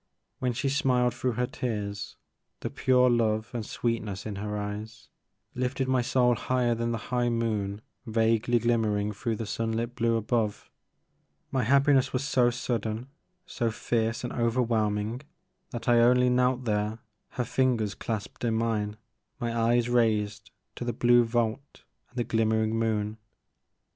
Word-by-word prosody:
When 125 Hz, -, 0 dB
she 130 Hz, +4 st, -2 dB
smiled 130 Hz, -4 st, +2 dB
through 125 Hz, 0 st, -1 dB
her 125 Hz, +2 st, 0 dB
tears, 105 Hz, -6 st, -4 dB, 0.5 s
the -, -, -3 dB
pure 125 Hz, -1 st, +3 dB
love 110 Hz, -2 st, +1 dB
and 120 Hz, -2 st, -2 dB
sweetness 110 Hz, -3 st, -3 dB
in 105 Hz, -2 st, -4 dB
her 105 Hz, +1 st, -3 dB
eyes 105 Hz, +2 st, -6 dB, 0.4 s
lifted 130 Hz, +1 st, -1 dB
my 130 Hz, -1 st, +2 dB
soul 125 Hz, 0 st, +3 dB
higher 120 Hz, +1 st, +1 dB
than 115 Hz, 0 st, -1 dB
the 115 Hz, -, -1 dB, 0.2 s
high 120 Hz, -1 st, +2 dB
moon 110 Hz, -3 st, -1 dB, 0.3 s
vaguely 115 Hz, +1 st, +2 dB
glimmering 110 Hz, -3 st, +1 dB
through 115 Hz, +2 st, -2 dB
the 115 Hz, -, -4 dB
sun 115 Hz, +2 st, -2 dB
lit 115 Hz, +2 st, -2 dB
blue 115 Hz, -1 st, +1 dB
above. 110 Hz, -1 st, -1 dB, 0.8 s
My 130 Hz, -, +1 dB
happiness 140 Hz, +1 st, +3 dB
was 130 Hz, +1 st, 0 dB
so 125 Hz, -4 st, +3 dB
sudden, 120 Hz, 0 st, -3 dB, 0.4 s
so 120 Hz, -9 st, -1 dB
fierce 115 Hz, +1 st, -1 dB
and 125 Hz, -, -4 dB
overwhelming 115 Hz, -1 st, 0 dB, 0.5 s
that 120 Hz, -, -6 dB
I 120 Hz, -1 st, +5 dB
only 125 Hz, +1 st, +5 dB
knelt 125 Hz, 0 st, +2 dB
there, 105 Hz, 0 st, 0 dB, 0.4 s
her 125 Hz, -, -1 dB
fingers 115 Hz, -4 st, +1 dB
clasped 110 Hz, 0 st, -5 dB
in 115 Hz, -2 st, +1 dB
mine, 110 Hz, -2 st, -1 dB, 0.4 s
my 120 Hz, -2 st, -2 dB
eyes 115 Hz, +1 st, +2 dB
raised 110 Hz, -3 st, +1 dB, 0.3 s
to -, -, -4 dB
the 120 Hz, 0 st, -2 dB
blue 120 Hz, +1 st, +5 dB
vault 115 Hz, +3 st, -2 dB, 0.3 s
and 125 Hz, -, -18 dB
the 120 Hz, -, +1 dB
glimmering 110 Hz, -1 st, +1 dB
moon. 110 Hz, -1 st, -1 dB
115 Hz, 150 wpm, -28 LUFS, 110-125 Hz, 0.8 s, I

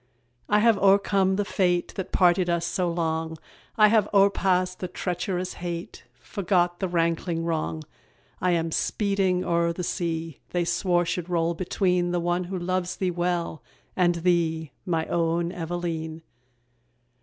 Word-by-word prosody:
I 210 Hz, -, +4 dB
have 230 Hz, -2 st, +4 dB
o'ercome 195 Hz, -1 st, +3 dB
the 205 Hz, +1 st, 0 dB
fate 180 Hz, -3 st, 0 dB
That 190 Hz, -, -5 dB
parted 180 Hz, -1 st, +3 dB
us 170 Hz, 0 st, +1 dB
so 180 Hz, -1 st, 0 dB
long; 160 Hz, -1 st, -2 dB, 0.4 s
I 215 Hz, -1 st, +7 dB
have 210 Hz, -2 st, +3 dB
o'erpast 185 Hz, -2 st, +3 dB
the 185 Hz, -, -3 dB
treacherous 180 Hz, +1 st, -3 dB
hate, 170 Hz, -6 st, -6 dB
Forgot 175 Hz, -2 st, 0 dB
the 190 Hz, -, 0 dB
rankling 165 Hz, -1 st, 0 dB
wrong. 160 Hz, -1 st, -2 dB, 0.6 s
I 180 Hz, 0 st, +2 dB
am 165 Hz, -1 st, 0 dB
speeding 195 Hz, -1 st, 0 dB
o'er 170 Hz, 0 st, +2 dB
the 180 Hz, +2 st, -5 dB
sea 165 Hz, -3 st, -3 dB
They 175 Hz, -1 st, 0 dB
swore 175 Hz, 0 st, +1 dB
should 175 Hz, +1 st, -3 dB
roll 170 Hz, -1 st, +1 dB
between 180 Hz, 0 st, 0 dB
The 175 Hz, 0 st, 0 dB
one 175 Hz, +1 st, 0 dB
who 185 Hz, +1 st, -4 dB
loves 185 Hz, +1 st, -2 dB
thee 185 Hz, -2 st, -1 dB
well, 175 Hz, -2 st, -2 dB, 0.3 s
and 175 Hz, -2 st, +3 dB
thee, 165 Hz, -3 st, 0 dB, 0.2 s
My 165 Hz, -2 st, 0 dB
own 170 Hz, 0 st, 0 dB
Eveleen! 165 Hz, -2 st, -4 dB
175 Hz, 145 wpm, -26 LUFS, 170-185 Hz, 0.6 s, I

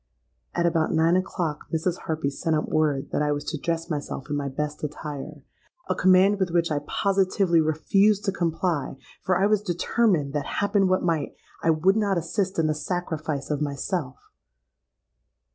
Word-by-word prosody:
'—At 170 Hz, -, +1 dB
about 165 Hz, -2 st, +1 dB
nine 165 Hz, +2 st, +3 dB
o'clock 180 Hz, -5 st, -2 dB
Mrs. 170 Hz, +2 st, -1 dB
Harpy 155 Hz, -3 st, -1 dB
sent 160 Hz, +3 st, -1 dB
up 150 Hz, -, -1 dB
word 150 Hz, -3 st, 0 dB
that -, -, 0 dB
I 150 Hz, 0 st, +1 dB
was 145 Hz, 0 st, -2 dB
to 155 Hz, -, -3 dB
dress 165 Hz, +1 st, -2 dB
myself 145 Hz, -2 st, -5 dB
in -, -, 0 dB
my 140 Hz, -1 st, -2 dB
best 150 Hz, +3 st, -4 dB
attire—a 150 Hz, -, -7 dB
command 185 Hz, +2 st, +4 dB
with 190 Hz, -2 st, +1 dB
which 170 Hz, -1 st, +1 dB
I 145 Hz, -, +1 dB
positively 190 Hz, -3 st, +2 dB
refused 195 Hz, +7 st, +2 dB
to 195 Hz, -, +2 dB
comply 165 Hz, -5 st, -1 dB, 0.2 s
for 185 Hz, -1 st, +1 dB
I 195 Hz, -, +3 dB
was 210 Hz, -1 st, +3 dB
determined 175 Hz, -5 st, +1 dB
that, 145 Hz, -2 st, -2 dB
happen 200 Hz, -1 st, +2 dB
what 185 Hz, 0 st, +1 dB
might, 165 Hz, -5 st, -1 dB, 0.3 s
I 165 Hz, -, +1 dB
would 170 Hz, +6 st, +3 dB
not 200 Hz, -3 st, +1 dB
assist 190 Hz, +3 st, -2 dB
in 165 Hz, -, +2 dB
the 155 Hz, -, +2 dB
sacrifice 155 Hz, -3 st, -3 dB
of 150 Hz, 0 st, -1 dB
myself! 145 Hz, 0 st, -2 dB
165 Hz, 170 wpm, -25 LUFS, 150-185 Hz, 0.3 s, command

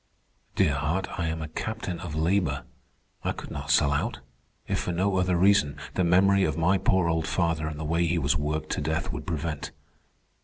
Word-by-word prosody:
Dear 75 Hz, -, +3 dB
heart, 75 Hz, +7 st, -1 dB
I 85 Hz, -, 0 dB
am 80 Hz, 0 st, -3 dB
a -, -, -4 dB
captain 90 Hz, +1 st, -4 dB
of 85 Hz, -4 st, -6 dB
labor. 80 Hz, -5 st, +1 dB, 0.6 s
I -, -, 0 dB
could -, -, -9 dB
not 70 Hz, -2 st, -6 dB
sell 70 Hz, 0 st, +4 dB
out. 70 Hz, -1 st, -1 dB, 0.5 s
If -, -, 0 dB
for -, -, -2 dB
no 95 Hz, +3 st, +1 dB
other 90 Hz, -1 st, +2 dB
reason, 90 Hz, -6 st, +4 dB, 0.2 s
the 95 Hz, -, +1 dB
memory 95 Hz, +3 st, +4 dB
of 75 Hz, -3 st, 0 dB
my 90 Hz, +4 st, +3 dB
poor 95 Hz, -2 st, +2 dB
old 80 Hz, -1 st, 0 dB
father 80 Hz, -3 st, 0 dB
and 75 Hz, -1 st, -5 dB
the 80 Hz, -, -4 dB
way 85 Hz, +2 st, +1 dB
he 85 Hz, +2 st, +1 dB
was 75 Hz, 0 st, +2 dB
worked 75 Hz, +1 st, -2 dB
to -, -, -1 dB
death -, -, -1 dB
would -, -, -6 dB
prevent." 80 Hz, -2 st, -3 dB
85 Hz, 200 wpm, -27 LUFS, 75-90 Hz, 0.6 s, sell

